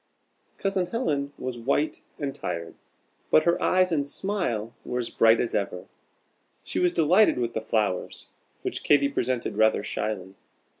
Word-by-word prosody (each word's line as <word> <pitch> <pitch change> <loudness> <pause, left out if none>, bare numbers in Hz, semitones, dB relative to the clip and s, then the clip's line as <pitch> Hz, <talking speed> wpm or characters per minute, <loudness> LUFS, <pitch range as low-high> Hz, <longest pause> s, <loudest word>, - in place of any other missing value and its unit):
Cousin 195 -2 0
Helen 150 - -1
was 125 -2 -5
white 140 +6 0 0.2
and 140 -2 -3
tired, 85 -11 -5 0.6
but 155 - +5
her 170 0 +2
eyes 185 -1 +3
and 145 -3 0
smile 125 - -2
were 125 - -3
as 120 -2 -2
bright 115 0 +5
as 120 - -1
ever. 95 -2 -2 0.8
She - - -3
was 180 -1 +3
delighted 175 +5 +4
with 120 -1 -1
the 110 - -2
flowers, 105 -4 -1 0.3
which - - -3
Katy 140 -1 +4
presented 125 -5 -1
rather 110 0 +3
shyly. 95 -3 -3
130 Hz, 150 wpm, -26 LUFS, 110-170 Hz, 0.8 s, but